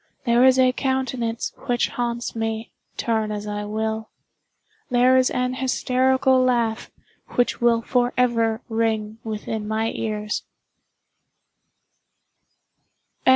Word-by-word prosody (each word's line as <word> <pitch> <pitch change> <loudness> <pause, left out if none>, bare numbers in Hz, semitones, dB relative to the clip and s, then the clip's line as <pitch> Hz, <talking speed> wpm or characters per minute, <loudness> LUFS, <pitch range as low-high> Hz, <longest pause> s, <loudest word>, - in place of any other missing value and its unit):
There 235 0 +4
is 260 0 +6
a 255 -1 +5
countenance 255 -3 -2
which 240 -1 +1
haunts 235 -1 -3
me, 225 0 -3 0.3
turn 220 -2 0
as 210 0 -4
I 210 0 -4
will. 220 +1 -3 0.8
There 250 +1 +4
is 255 0 +4
an 250 0 -1
hysterical 260 0 +2
laugh 235 -3 +1 0.5
which 245 0 +1
will 230 -1 +3
forever 240 -2 +1
ring 220 -1 -1
within 215 -1 -4
my 220 +1 0
ears. 210 -1 -3
235 Hz, 105 wpm, -23 LUFS, 220-250 Hz, 0.8 s, is